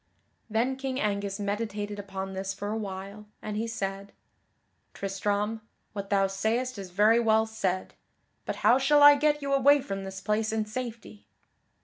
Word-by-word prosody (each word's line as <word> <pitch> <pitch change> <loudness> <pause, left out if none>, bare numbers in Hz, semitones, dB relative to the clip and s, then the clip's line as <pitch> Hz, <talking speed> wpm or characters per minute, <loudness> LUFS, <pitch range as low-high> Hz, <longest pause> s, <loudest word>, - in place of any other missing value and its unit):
Then 240 +5 0
King 265 -1 -3
Angus 200 -1 -1
meditated 205 0 -3
upon 195 -1 -5
this 190 0 -4
for 205 - -5
a - - -1
while, 200 0 -6
and 210 -1 -5
he 225 +2 -1
said: 195 -2 -4 0.8
"Tristram, 205 +3 -2 0.3
what 200 -2 -5
thou 200 -1 +3
sayest 220 +5 -1
is 190 -2 -7
very 210 +5 +4
well 220 -1 +3
said, 195 -4 -2 0.5
but - - -4
how 255 - +6
shall 290 +2 +5
I 290 0 +11
get 295 0 +1
you 275 0 -1
away 285 +2 +5
from 195 -6 -5
this 190 0 -6
place 215 +2 0
in 220 -1 -1
safety?" 225 -2 -7
210 Hz, 160 wpm, -28 LUFS, 195-230 Hz, 0.8 s, I